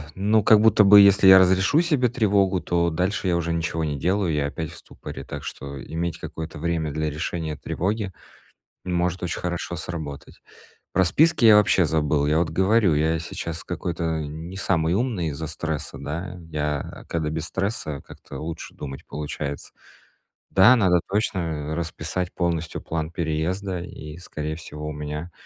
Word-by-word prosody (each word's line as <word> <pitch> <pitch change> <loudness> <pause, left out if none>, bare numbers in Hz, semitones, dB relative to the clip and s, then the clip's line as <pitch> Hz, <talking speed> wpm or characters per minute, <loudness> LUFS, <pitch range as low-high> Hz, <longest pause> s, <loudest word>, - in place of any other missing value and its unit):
Ну, 105 +3 +2
как 110 +1 +7
будто 110 -1 +6
бы 100 +1 +9
если 100 -1 +6
я 95 0 +10
разрешу 95 - +4
себе 150 -8 +2
тревогу, 100 -5 +2
то 85 -1 +1
дальше 95 +7 -1
я 90 - +2
уже 85 -1 -1
ничего 80 0 -1
не 75 -2 -2
делаю, 90 +3 0
я 75 -1 0
опять 75 +2 -5
в - - -11
ступоре. - - -9
Так 70 0 -7
что 70 0 -7
иметь 85 0 -3
какое-то 80 -2 -7
время 80 -1 -1
для 80 +1 -1
решения 80 +1 -3
тревоги 100 +7 -2 0.7
может 90 0 -1
очень 85 - -2
хорошо 85 0 -3
сработать. 80 -4 -7 0.5
Про 95 - +4
списки 160 - +3
я 110 -2 +9
вообще 100 -3 +4
забыл. 75 -2 +1
Я 75 +2 +3
вот 85 - 0
говорю, 95 0 +3
я 80 +2 +1
сейчас 80 0 -5
какой-то 85 -2 -2
не 80 +5 -7
самый 85 -4 +1
умный 105 -8 -1
из-за 75 +2 -5
стресса, 80 -1 -4
да? 90 +4 -5
Я, 75 -2 -3
э, - - -26
когда 80 -2 -2
без 80 0 -3
стресса, 95 -5 -3
как-то 70 - -10
лучше 80 +1 -6
думать 70 -2 -8
получается. 75 -1 -5 0.8
Да, 110 +7 +7
надо 95 -7 +4
точно, 100 -1 0
э, 80 -3 -3
расписать 85 +2 -3
полностью 85 -3 -2
план 80 -1 -3
переезда, 85 +3 -2
и, 75 -2 -9
скорее 75 -3 -5
всего, 75 -2 -8
у - - -3
меня 75 +3 -5
85 Hz, 165 wpm, -24 LUFS, 75-95 Hz, 0.8 s, я